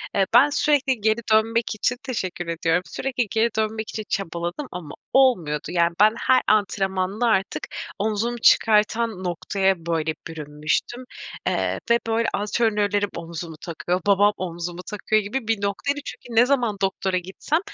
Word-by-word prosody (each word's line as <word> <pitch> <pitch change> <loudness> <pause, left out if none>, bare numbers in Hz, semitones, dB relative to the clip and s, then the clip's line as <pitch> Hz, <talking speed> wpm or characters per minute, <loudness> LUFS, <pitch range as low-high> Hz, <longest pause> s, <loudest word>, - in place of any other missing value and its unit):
Eee, 195 - +3
ben 265 +5 +7
sürekli 280 -5 +1
geri 220 +2 +2
dönmek 225 +1 +2
için 245 +4 0
Teşekkür 185 -9 -4
ediyorum. 165 +1 +1
Sürekli 250 +7 -2
geri 225 +1 +2
dönmek 220 0 -1
için 215 - -5
çabaladım 175 - -3
ama 170 -5 -7 0.2
olmuyordu. 180 - +3
Yani, 170 -1 +2
ben 215 +1 +6
her 260 0 +4
antrenmanla 195 +1 +1
artık 195 -4 0 0.3
omzumu 220 +3 -1
çıkartan 220 -2 +3
noktaya, 190 +2 0
böyle, 160 -2 0
bürünmüştüm, 155 - -3 0.4
eee, - - 0
ve, 235 - +5
böyle, 230 +1 +1
antrenörlerim 205 -1 +1
omzumu 170 -1 -6
takıyor, 175 +2 -2
babam 205 +1 +5
omzumu 175 0 -5
takıyor 215 +1 +1
gibi 220 +4 -4
bir 225 -3 0
noktaydı. 200 +9 -1
Çünkü 230 -1 0
ne - - +5
zaman 245 -6 +1
doktora 190 -1 0
gitsem, 190 - -2
205 Hz, 140 wpm, -23 LUFS, 180-230 Hz, 0.4 s, ben